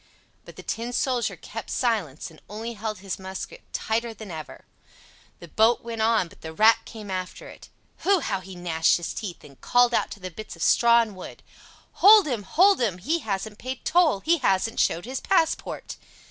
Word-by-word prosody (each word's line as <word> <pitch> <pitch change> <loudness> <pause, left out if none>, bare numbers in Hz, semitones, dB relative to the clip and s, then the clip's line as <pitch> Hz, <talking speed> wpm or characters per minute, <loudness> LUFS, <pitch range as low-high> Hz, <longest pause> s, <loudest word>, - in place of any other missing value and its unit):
But - - -13
the - - -11
Tin 235 +2 -4
Soldier 245 -1 0
kept - - -8
silence, 190 - -1
and 155 - -18
only 225 +3 -5
held 215 0 -4
his 195 -1 -5
musket 190 - -7
tighter 230 0 -2
than 215 -4 -9
ever. 155 -2 -9 0.7
The 170 - -11
boat 220 +7 +3
went 230 -1 -5
on, 220 -4 +2
but 195 - -19
the 160 0 -7
Rat 220 +6 +5
came 210 -3 -9
after 185 -1 -5
it. - - -14 0.3
Hu! 395 -1 +3
how 195 -2 -2
he 190 0 -11
gnashed 165 -2 +2
his 170 - -5
teeth, 195 -6 -6
and 140 -2 -16
called 245 0 +3
out - - +1
to 205 - -9
the 185 -1 -7
bits 215 +5 -9
of - - -5
straw 235 0 +5
and 215 -3 -9
wood: 185 - -10 0.6
"Hold 415 +1 +9
him! 245 -7 -2
hold 365 - +4
him! 205 -7 0
he 305 - -1
hasn't 210 -3 -4
paid 260 +1 -6
toll—he 335 - +3
hasn't 225 -2 +1
showed 170 +4 +1
his 260 +2 -4
passport!" 330 -4 -1
220 Hz, 190 wpm, -25 LUFS, 190-245 Hz, 0.7 s, Hold